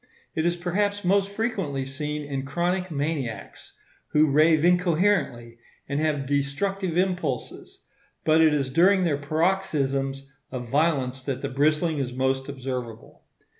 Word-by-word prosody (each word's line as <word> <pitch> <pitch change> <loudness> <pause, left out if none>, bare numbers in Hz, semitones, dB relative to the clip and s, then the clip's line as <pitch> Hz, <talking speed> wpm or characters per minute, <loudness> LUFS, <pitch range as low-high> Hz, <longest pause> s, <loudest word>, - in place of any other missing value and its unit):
It 160 +1 0
is 175 - +1
perhaps 200 +3 -1
most 195 +2 +3
frequently 200 - -2
seen 150 +2 -4
in 140 -2 -4
chronic 175 +6 -1
maniacs, 140 - -4 0.3
who 150 -1 +3
rave 155 +2 +4
incoherently 175 - +1 0.3
and 140 +1 -1
have 150 -3 0
destructive 165 +7 -1
impulses; 180 -8 -2 0.4
but 160 +1 +5
it 160 -1 +6
is 140 -3 0
during 185 +6 +4
their 150 -5 +1
paroxysms 140 -4 0 0.2
of 125 -2 -6
violence 135 -3 +1
that 130 -1 -4
the 140 - -1
bristling 155 +3 +1
is 125 -2 -3
most 130 +1 -1
observable. 125 -4 -6
150 Hz, 130 wpm, -25 LUFS, 135-175 Hz, 0.4 s, it